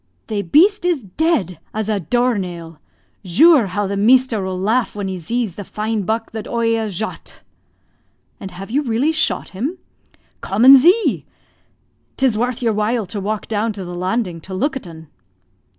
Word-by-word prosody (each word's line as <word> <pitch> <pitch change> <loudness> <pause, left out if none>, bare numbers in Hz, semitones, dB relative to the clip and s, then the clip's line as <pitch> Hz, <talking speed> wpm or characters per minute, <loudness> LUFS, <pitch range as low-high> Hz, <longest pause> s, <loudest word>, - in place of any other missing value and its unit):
"Thae 210 -2 -1
beast 360 - +3
iz 345 -8 0
dead 200 - -1 0.2
az 215 -1 -2
a 215 -2 0
door 240 +5 0
nail. 170 -4 -7 0.4
Zure, 265 - +5
how 200 +3 -2
the 200 +1 -3
measter 235 +1 +3
will 190 -1 -3
laugh 220 +5 0
when 200 -2 -3
he 190 - -4
zees 220 +4 -3
the 205 - -5
fine 215 +2 -3
buck 225 +3 -2
that 220 -1 -6
oie 230 -1 0
a'zhot." 220 -2 -5 1.0
"And 195 - -7
have 195 +3 -9
you 280 +4 +1
really 260 +3 0
shot 315 - -1
him?" 265 - -4 0.6
"Come 210 +5 +1
and 270 +1 +11
zee! 365 - +3 0.9
'Tis 260 -4 +2
worth 245 +3 -2
your 225 -2 +2
while 215 +2 0
to 200 +2 -5
walk 210 +2 -3
down 220 +1 -1
to 195 -2 -7
the 175 - -7
landing 185 -1 -2
to 190 +3 -8
look 270 +8 -1
at 265 - -6
'un." 160 -1 -12
220 Hz, 175 wpm, -19 LUFS, 190-250 Hz, 1.0 s, and